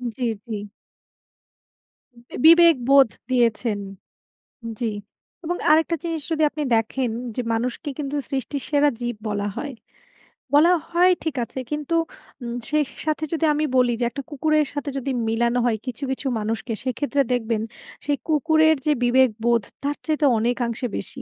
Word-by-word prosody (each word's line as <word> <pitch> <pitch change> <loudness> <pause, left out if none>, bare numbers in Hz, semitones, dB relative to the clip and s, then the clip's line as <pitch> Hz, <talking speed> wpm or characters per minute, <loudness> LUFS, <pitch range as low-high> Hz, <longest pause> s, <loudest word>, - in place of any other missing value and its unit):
জি, 255 - -5 0.2
জি। 225 - -3 1.9
বিবেকবোধ 280 -7 +7 0.2
দিয়েছেন। 235 -3 +1 1.0
জি। 230 -3 -1 0.5
এবং 350 +2 -1
আরেকটা 325 +2 +4
জিনিস 330 -2 -2
যদি 315 -1 0
আপনি 300 - -4
দেখেন 230 +2 -1 0.3
যে 250 - 0
মানুষকে 245 +6 -2
কিন্তু 285 0 -3
সৃষ্টির 275 0 -3
সেরা 290 0 +3
জীব 240 -1 -3
বলা 205 0 -2
হয়। 285 -3 -5 0.8
বলা 330 +5 +6 0.2
হয় 360 +2 +4
ঠিক 315 -3 -2
আছে, 260 - -6
কিন্তু 300 +2 -2 0.5
উম 235 -1 -4
সেই 300 0 +2 0.2
সাথে 310 0 -1
যদি 325 0 +1
আমি 305 +1 0
বলি 245 -1 +4
যে - - 0
একটা 275 +4 -6
কুকুরের 305 +1 +1
সাথে 290 0 -3
যদি 270 +1 -2 0.2
মিলানো 235 +2 +1
হয় 230 -2 +1
কিছু, 255 +2 -6
কিছু 265 +1 -3
মানুষকে 225 +2 -3
সেক্ষেত্রে 280 +2 0
দেখবেন 225 -2 -1 0.4
সেই 290 0 +1
কুকুরের 315 +1 +4
যে 300 - +4
বিবেকবোধ 240 -2 +3 0.2
তার 290 +1 -1
চাইতে 310 -1 +1
অনেকাংশে 240 +1 -1
বেশি। 260 +6 -5
270 Hz, 140 wpm, -23 LUFS, 240-305 Hz, 1.9 s, বিবেকবোধ